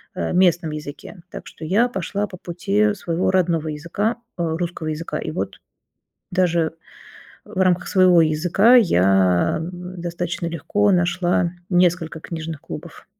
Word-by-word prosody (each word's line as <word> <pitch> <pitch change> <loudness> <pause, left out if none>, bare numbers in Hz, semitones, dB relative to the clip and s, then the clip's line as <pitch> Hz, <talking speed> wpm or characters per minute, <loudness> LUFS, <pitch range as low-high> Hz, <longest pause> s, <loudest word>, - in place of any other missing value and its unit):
э, 85 - -2
местном 175 -3 +3
языке. 150 +6 -8
Так - - -8
что 160 - -10
я 215 +9 +3
пошла 200 0 -3
по 185 - -10
пути 200 +5 0
своего 175 -2 -1
родного 170 -4 +1
языка, 170 +10 -2 0.2
а, 165 -2 -1
русского 170 -2 -4
языка. 155 +2 -3
И - - -4
вот - - -4 0.7
даже 170 -3 +1 0.7
в 205 -3 -7
рамках 185 -1 +2
своего 185 -3 +5
языка 175 +9 +4
я 95 - +3
н 180 +1 -7
достаточно 175 0 -3
легко 200 +5 +1
нашла 175 -1 +1 0.2
несколько 175 -3 +1
книжных 160 -3 -6
клубов. 170 0 -9
175 Hz, 135 wpm, -21 LUFS, 160-185 Hz, 0.7 s, своего